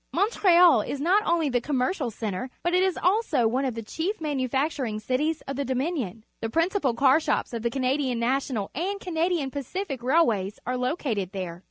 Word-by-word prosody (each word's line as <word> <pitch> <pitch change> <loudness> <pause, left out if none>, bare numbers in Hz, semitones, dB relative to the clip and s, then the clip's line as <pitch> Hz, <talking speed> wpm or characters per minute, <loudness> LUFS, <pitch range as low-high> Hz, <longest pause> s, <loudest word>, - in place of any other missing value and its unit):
Montreal 360 - +5
is 280 - -4
not 365 +8 +3
only 335 -2 +2
the 245 -2 +1
commercial 265 +1 -1
centre, 220 +2 -4
but 345 - 0
it 365 - +4
is 380 -1 +1
also 360 - +2
one 255 +5 0
of 255 -3 -2
the 230 - -5
chief 345 - -3
manufacturing 270 -5 -1
cities 295 +8 -1
of 275 -1 -4
the 280 - 0
Dominion. 260 - -2 0.2
The 225 - -2
principal 330 - +1
car 270 +4 +5
shops 305 - -1
of 230 - -3
the 235 - 0
Canadian 260 0 0
National 235 -3 -1
and 385 +7 -2
Canadian 335 -5 -1
Pacific 280 +1 -4
Railways 235 - +2
are 250 - -1
located 250 - -2
there. 180 -3 -5
270 Hz, 180 wpm, -26 LUFS, 235-330 Hz, 0.2 s, Montreal